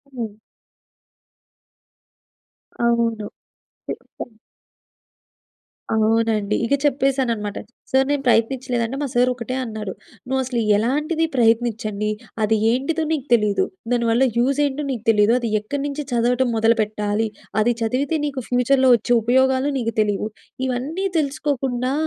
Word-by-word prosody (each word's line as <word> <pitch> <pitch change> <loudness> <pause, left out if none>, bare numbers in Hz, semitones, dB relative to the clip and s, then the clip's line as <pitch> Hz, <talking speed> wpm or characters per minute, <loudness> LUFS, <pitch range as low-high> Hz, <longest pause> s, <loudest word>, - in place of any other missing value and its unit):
హ్మ్. 220 -3 -5 2.5
అవును. 230 -2 +1 0.6
చెప్పా. - - -7 1.7
అవునండి. 220 -1 +2
ఇక 255 - 0
చెప్పేసాననమాట. 265 -7 0 0.3
సార్, 265 0 +4
నేను 285 -1 0
ప్రయత్నించలేదంటే" 245 +1 +1
మా 290 - -1
సార్ 245 0 +3
ఒకటే 245 +1 -5
అన్నాడు. 215 -5 -5 0.3
"నువ్వు 265 +1 0
అసలు 250 -1 -2 0.2
ఎలాంటిది 300 +9 0
ప్రయత్నించంది, 225 -3 +1 0.3
అది 220 +1 +3 0.2
ఏంటిదో 285 +6 0
నీకు 290 -5 -1
తెలీదు. 210 - +3 0.3
దానివల్ల 235 +1 +2
యూజ్ 270 +4 +2
ఏంటో 285 +1 -2
నీకు 235 -5 -4
తెలీదు. 210 0 +4
అది 235 -2 -2
ఎక్కడి 275 +7 -4
నుంచి 290 +1 -4
చదవటం 245 +1 +2
మొదలుపెట్టాలి, 220 -1 +1 0.3
అది 240 - +3
చదివితే 260 +7 0
నీకు 280 -2 -3
ఫ్యూచర్‍లో 260 +2 +3
వచ్చే 235 +1 0
ఉపయోగాలు 260 +3 +2
నీకు 230 -1 -2
తెలియవు. 210 0 0 0.4
ఇవన్నీ 285 +10 -2
తెలుసుకోకుండా, 270 -3 -1
240 Hz, 110 wpm, -21 LUFS, 225-265 Hz, 2.5 s, సార్